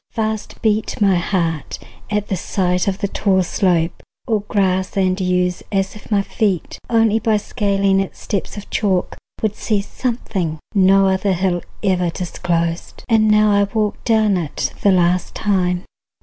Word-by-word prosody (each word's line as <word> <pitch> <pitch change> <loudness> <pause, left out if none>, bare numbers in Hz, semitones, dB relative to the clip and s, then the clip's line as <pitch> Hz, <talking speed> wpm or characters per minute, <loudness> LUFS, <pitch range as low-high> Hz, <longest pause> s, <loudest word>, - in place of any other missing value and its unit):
Fast 220 -1 -3
beat 215 -1 0
My 200 -2 +4
heart 170 -4 -1 0.3
at 210 -1 -1
the 195 - -1
sight 180 0 0
of 195 -1 0
the 200 - -1
tall 190 -1 +1
slope 175 -2 0 0.2
Or 220 -4 0
grass 190 -2 0
and 185 0 +1
yews, 180 -1 0
as 195 -1 0
if 210 - -13
my 205 -2 +2
feet 195 -4 -1
Only 225 -2 +3
by 220 -1 +2
scaling 200 -3 +1
its 195 - -4
steps 200 +1 -3
of 205 - -8
chalk 190 -4 0 0.3
Would 215 -1 0
see 215 -3 0
something 200 -7 -3 0.2
no 195 -1 +5
other 190 +1 +1
hill 180 -1 0 0.2
Ever 180 -3 +2
disclosed. 170 -1 -3
And 220 -2 +4
now 210 0 +5
I 200 0 +4
walk 210 0 -2
Down 220 -4 +3
it 160 -5 -3
the 200 - +4
last 180 -1 +1
time. 180 -3 0
195 Hz, 160 wpm, -19 LUFS, 180-210 Hz, 0.3 s, no